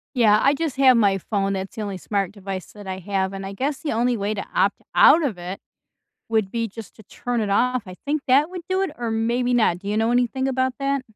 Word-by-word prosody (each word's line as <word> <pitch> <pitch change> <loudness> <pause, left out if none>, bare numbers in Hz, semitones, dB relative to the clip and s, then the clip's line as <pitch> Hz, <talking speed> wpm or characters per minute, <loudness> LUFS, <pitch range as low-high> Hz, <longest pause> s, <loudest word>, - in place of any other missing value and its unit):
Yeah, 215 -4 +5
I 275 - +5
just 300 -2 -3
have 260 -2 +6
my 200 -3 +3
phone, 195 +1 -1
that's 190 0 -5
the 220 - -5
only 200 -2 -4
smart 195 +1 -2
device 195 -2 -7
that 205 -1 -12
I 190 0 -4
have, 190 0 -2
and 195 0 -6
I 195 - -6
guess 270 +5 -2
the 310 - -3
only 240 +2 +1
way 205 +2 -1
to 200 - -4
opt - - +1
out 330 - +7
of 225 -10 -2
it 180 +2 -6 0.7
would 220 -4 0
be 230 -1 -1
just 220 +1 -11
to 220 - -14
turn 240 +3 -3
it 210 -2 -1
off, 250 +4 +2
I 185 - -8
think 295 0 0
that 280 +4 +4
would 365 -1 -6
do 375 +1 +1
it, 390 - -1
or 235 -1 -3
maybe 235 +3 0
not, 215 -8 +2
do 200 - -7
you 210 - -1
know 225 +2 +2
anything 250 +2 +1
about 260 -1 0
that? 275 -1 -1
225 Hz, 255 wpm, -23 LUFS, 195-255 Hz, 0.7 s, out